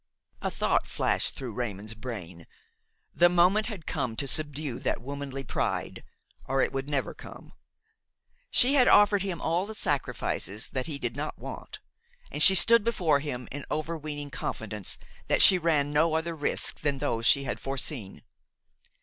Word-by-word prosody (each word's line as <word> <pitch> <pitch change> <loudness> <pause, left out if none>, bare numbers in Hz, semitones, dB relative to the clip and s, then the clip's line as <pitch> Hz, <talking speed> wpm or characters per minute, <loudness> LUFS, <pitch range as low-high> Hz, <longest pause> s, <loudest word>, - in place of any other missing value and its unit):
A - - -2
thought - - 0
flashed - - -1
through 125 -4 -6
Raymon's 105 -2 -5
brain. 100 -8 -9 0.7
The 175 0 +4
moment 180 +5 +3
had 200 -9 -7
come 130 -8 -3
to 140 - -4
subdue 145 -3 -4
that - - -2
womanly 135 +1 -6
pride, 120 - -3 0.4
or 135 +1 -1
it - - -2
would 135 +1 -4
never 140 -2 -2
come. - - -13 1.0
She 260 +2 +4
had 255 -4 +4
offered 205 -1 +5
him 185 -4 -4
all 175 +4 -1
the 220 - -8
sacrifices 135 - -2
that 130 +2 -3
he 150 -3 -4
did 120 -3 -4
not 150 +2 -5
want, - - -9 0.5
and - - +3
she 190 - +12
stood 230 +5 +6
before 175 -10 +1
him 125 -4 -6
in 145 +1 -6
overweening 150 -2 -5
confidence 105 -7 -4 0.3
that - - +5
she 185 - +8
ran 150 -4 0
no 160 +2 +2
other 165 +1 -2
risks 145 -2 -1
than 145 -2 0
those 115 -5 -1
she 140 - +4
had - - -4
foreseen. 130 - -4
145 Hz, 160 wpm, -27 LUFS, 125-170 Hz, 1.0 s, she